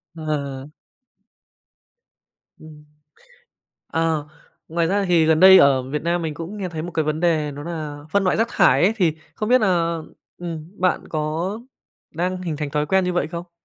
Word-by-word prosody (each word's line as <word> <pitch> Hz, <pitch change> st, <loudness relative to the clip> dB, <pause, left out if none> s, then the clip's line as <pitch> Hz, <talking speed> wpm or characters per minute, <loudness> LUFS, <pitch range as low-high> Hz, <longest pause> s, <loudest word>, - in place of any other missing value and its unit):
Ờ. 140 Hz, -3 st, -4 dB, 1.9 s
Ừm. 150 Hz, -1 st, -14 dB, 1.0 s
Ờ, 160 Hz, -2 st, -1 dB, 0.4 s
ngoài 165 Hz, 0 st, 0 dB
ra 200 Hz, +2 st, +1 dB
thì 170 Hz, -3 st, +3 dB
gần 160 Hz, 0 st, +3 dB
đây 190 Hz, 0 st, +9 dB
ở 135 Hz, -2 st, +5 dB
Việt 150 Hz, +1 st, -2 dB
Nam 170 Hz, +1 st, 0 dB
mình 160 Hz, -2 st, -3 dB
cũng 170 Hz, +7 st, -7 dB
nghe 190 Hz, -3 st, -4 dB
thấy 160 Hz, -2 st, -5 dB
một 175 Hz, +1 st, -6 dB
cái 160 Hz, -1 st, 0 dB
vấn 155 Hz, +1 st, -1 dB
đề 160 Hz, -4 st, +1 dB
đó 145 Hz, +1 st, -8 dB
là 155 Hz, -3 st, -6 dB
phân 200 Hz, -1 st, +2 dB
loại 185 Hz, -, +1 dB
rác 225 Hz, -, +2 dB
thải 135 Hz, +4 st, +4 dB
ấy, 205 Hz, +5 st, +4 dB
thì 165 Hz, -6 st, +2 dB, 0.2 s
không 215 Hz, +1 st, -3 dB
biết 255 Hz, 0 st, +5 dB
là, 170 Hz, -4 st, +1 dB, 0.4 s
ừm, 170 Hz, +1 st, -7 dB
bạn 185 Hz, 0 st, +1 dB
có 160 Hz, +7 st, -2 dB, 0.5 s
đang 180 Hz, +3 st, -2 dB
hình 160 Hz, -5 st, -4 dB
thành 150 Hz, -2 st, -3 dB
thói 150 Hz, +1 st, -1 dB
quen 190 Hz, +3 st, +2 dB
như 180 Hz, 0 st, -1 dB
vậy 165 Hz, -4 st, 0 dB
không? 170 Hz, +1 st, -8 dB
165 Hz, 180 wpm, -22 LUFS, 155-180 Hz, 1.9 s, đây